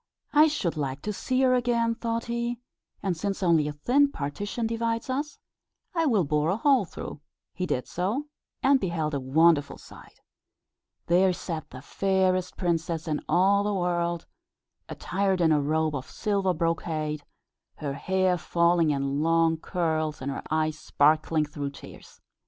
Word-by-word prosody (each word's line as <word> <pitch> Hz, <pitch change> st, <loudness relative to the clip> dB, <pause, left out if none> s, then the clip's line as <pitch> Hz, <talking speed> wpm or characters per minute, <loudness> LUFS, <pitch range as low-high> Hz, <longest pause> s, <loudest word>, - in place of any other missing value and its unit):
"I 300 Hz, +1 st, +7 dB
should 205 Hz, -, -2 dB
like 140 Hz, -1 st, -3 dB
to 210 Hz, -, -2 dB
see 255 Hz, +5 st, -1 dB
her 255 Hz, -1 st, +4 dB
again," 235 Hz, -2 st, +1 dB
thought 230 Hz, 0 st, -3 dB
he; 235 Hz, 0 st, -2 dB, 0.4 s
"and 190 Hz, -3 st, 0 dB
since 195 Hz, +3 st, -3 dB
only 165 Hz, -4 st, +3 dB
a -, -, -2 dB
thin 275 Hz, -, +2 dB
partition 205 Hz, -, -3 dB
divides 230 Hz, +2 st, -1 dB
us, 285 Hz, +2 st, -3 dB, 0.6 s
I 330 Hz, -2 st, +1 dB
will 215 Hz, -9 st, +3 dB
bore 150 Hz, +1 st, +1 dB
a 190 Hz, -, +1 dB
hole 270 Hz, -4 st, +3 dB
through." 150 Hz, -, -8 dB, 0.3 s
He 180 Hz, +2 st, -3 dB
did 125 Hz, -, -2 dB
so, 205 Hz, -, -2 dB, 0.4 s
and 275 Hz, 0 st, +5 dB
beheld 165 Hz, -6 st, -2 dB
a 140 Hz, -, 0 dB
wonderful 145 Hz, +2 st, +3 dB
sight. -, -, -15 dB, 0.9 s
There 185 Hz, +2 st, +4 dB
sat 165 Hz, -3 st, -5 dB
the 130 Hz, +1 st, -10 dB
fairest 185 Hz, 0 st, 0 dB
princess 170 Hz, -2 st, -1 dB
in 150 Hz, -2 st, -1 dB
all 195 Hz, +4 st, +4 dB
the 205 Hz, 0 st, -1 dB
world, 175 Hz, -2 st, -1 dB, 0.6 s
attired 190 Hz, 0 st, -1 dB
in 165 Hz, -2 st, +4 dB
a 150 Hz, -1 st, +3 dB
robe 155 Hz, +2 st, 0 dB
of 130 Hz, -, -6 dB
silver 200 Hz, -4 st, 0 dB
brocade, 155 Hz, -2 st, -2 dB, 0.5 s
her 145 Hz, -2 st, -4 dB
hair 185 Hz, +3 st, +1 dB
falling 170 Hz, -1 st, +2 dB
in 140 Hz, 0 st, 0 dB
long 165 Hz, 0 st, +3 dB
curls, 160 Hz, -2 st, -2 dB
and 135 Hz, +1 st, -3 dB
her -, -, -4 dB
eyes 155 Hz, 0 st, 0 dB
sparkling 155 Hz, +1 st, +2 dB
through 145 Hz, -1 st, -5 dB
tears. 140 Hz, -, -13 dB
175 Hz, 160 wpm, -27 LUFS, 155-210 Hz, 0.9 s, I